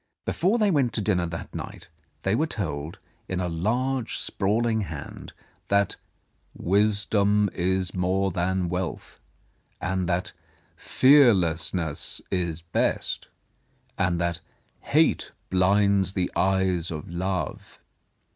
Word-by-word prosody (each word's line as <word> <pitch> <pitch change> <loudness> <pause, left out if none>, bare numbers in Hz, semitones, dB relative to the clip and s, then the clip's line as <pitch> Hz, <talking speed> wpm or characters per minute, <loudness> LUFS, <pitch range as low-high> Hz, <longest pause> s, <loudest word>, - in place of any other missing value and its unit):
Before 195 +7 +1
they 210 -3 +3
went 135 -7 +2
to 110 - 0
dinner 90 -4 +1
that 85 0 -7
night, - - -7 0.4
they 95 - +1
were 155 +8 +2
told, 80 - -4 0.3
in 90 - -2
a 90 - -1
large, 120 +9 -1
sprawling 110 +3 0
hand, 80 -7 -7 0.4
that 100 -1 +2 0.6
"Wisdom 100 +1 +2
is 95 0 0
more 95 +1 +1
than 90 +1 0
wealth," 90 +1 -4 0.6
and 95 -1 -1
that 90 +1 -1 0.4
"Fearless 100 - +4
ness 80 -5 -3
is 85 -3 -1
best," 85 - -1 0.7
and 90 -3 +1
that 85 -1 -1 0.4
"Hate - - +2 0.2
blinds 95 +1 +3
the 90 -3 -1
eyes 95 -1 +1
of 75 -3 -6
Love." 90 +2 -3
95 Hz, 115 wpm, -26 LUFS, 85-105 Hz, 0.7 s, Fearless